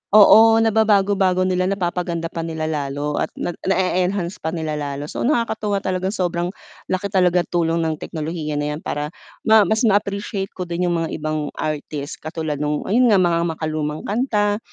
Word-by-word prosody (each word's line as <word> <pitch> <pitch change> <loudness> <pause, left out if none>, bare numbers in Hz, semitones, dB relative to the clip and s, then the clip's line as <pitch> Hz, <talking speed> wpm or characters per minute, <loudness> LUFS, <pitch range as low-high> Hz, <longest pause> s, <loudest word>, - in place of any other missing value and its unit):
Oo, 220 +2 +8
nababago-bago 200 -4 +3
nila, 185 0 +1
napapaganda 175 -3 -2
pa 165 - -5
nila 160 -1 -4
lalo 145 -1 -2
at - - 0
nag 175 - -4
na-e-enhance 185 0 0
pa 160 +2 -3
nila 155 -2 -3
lalo, 140 0 -4
so - - -5
nakakatuwa 220 -6 0
talagang 185 +2 -1
sobrang 175 -1 -1 0.4
laki 195 +1 -1
talagang 180 -2 +3
tulong 165 -1 +1
ng 160 -1 -2
teknolohiya 155 -1 -4
na 145 0 -1
'yan - - -7
para 150 +1 -3 0.3
ma 220 -3 +5
mas 220 +2 +1
ma-appreciate 200 -1 0
ko 185 - -3
din 175 +1 -2
'yung 175 - +1
mga 160 - -3
ibang 155 -1 -3
artist 150 -1 -4
katulad 155 -2 -3
nung 150 0 -1
ayun 240 +2 +4
nga 200 - +5
mga 170 -2 +2 0.2
makalumang 155 -1 -2
kanta 210 -2 +1
175 Hz, 165 wpm, -21 LUFS, 155-200 Hz, 0.4 s, Oo